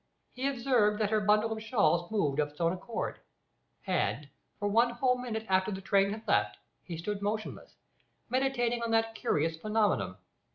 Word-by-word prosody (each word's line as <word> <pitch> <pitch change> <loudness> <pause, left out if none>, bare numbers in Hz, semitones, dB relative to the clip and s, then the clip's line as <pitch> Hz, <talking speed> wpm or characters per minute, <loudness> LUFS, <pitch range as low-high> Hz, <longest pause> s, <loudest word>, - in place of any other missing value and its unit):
He 260 +2 -2
observed 240 -6 +2
that 210 -1 +1
her 215 - +3
bundle 210 +2 +3
of 220 0 -3
shawls 205 -6 +2
moved 155 -10 0
of 150 -1 +1
its 150 - -21
own 170 0 +2
accord, 185 +5 -4 0.7
and, 150 - 0 0.3
for 205 - -1
one 230 +4 +4
whole 250 +1 +1
minute 230 -3 -4
after 190 +1 +2
the 190 - -4
train 195 +1 +2
had 215 +2 -6
left, 105 0 +2 0.2
he 170 -2 -7
stood 200 +5 -4
motionless, 215 +1 -4 0.5
meditating 245 -2 0
on 230 - -2
that 225 0 +2
curious 160 -6 0
phenomenon. 210 - 0
210 Hz, 170 wpm, -30 LUFS, 180-230 Hz, 0.7 s, one